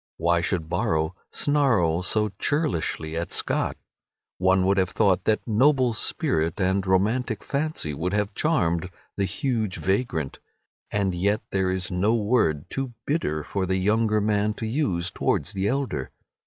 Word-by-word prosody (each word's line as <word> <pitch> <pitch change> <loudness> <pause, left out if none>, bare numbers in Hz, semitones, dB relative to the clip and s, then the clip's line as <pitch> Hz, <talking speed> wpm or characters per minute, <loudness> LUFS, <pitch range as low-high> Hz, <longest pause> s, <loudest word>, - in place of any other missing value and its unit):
Why 85 0 +2
should 85 -2 -1
Borrow 80 -3 0 0.2
snarl 115 - +2
so 105 +3 0
churlishly 85 - -1
at 85 +1 -3
Scott? - - -1 0.6
One 95 0 +3
would 100 +1 +3
have 95 -1 +2
thought 95 -2 +2
that 110 +2 +1
noble 130 +2 +3
spirit 80 -5 -1
and 95 +1 +1
romantic 110 +4 +1
fancy 140 - -2
would 85 +6 -2
have 105 0 0
charmed 90 - +1 0.3
the 100 - 0
huge 110 - -1
vagrant, 95 - -1 0.5
and 100 -3 0
yet 100 +4 0
there 95 -1 +1
is 95 -1 -2
no 100 +6 +2
word 100 - +1
too 135 -2 -3
bitter 75 - -1
for 95 +3 -2
the 95 +1 +1
younger 110 +3 +2
man 105 0 +1
to 110 - -5
use 105 - -1
towards - - 0
the 95 0 -1
elder. 130 - -1
100 Hz, 150 wpm, -25 LUFS, 90-115 Hz, 0.6 s, One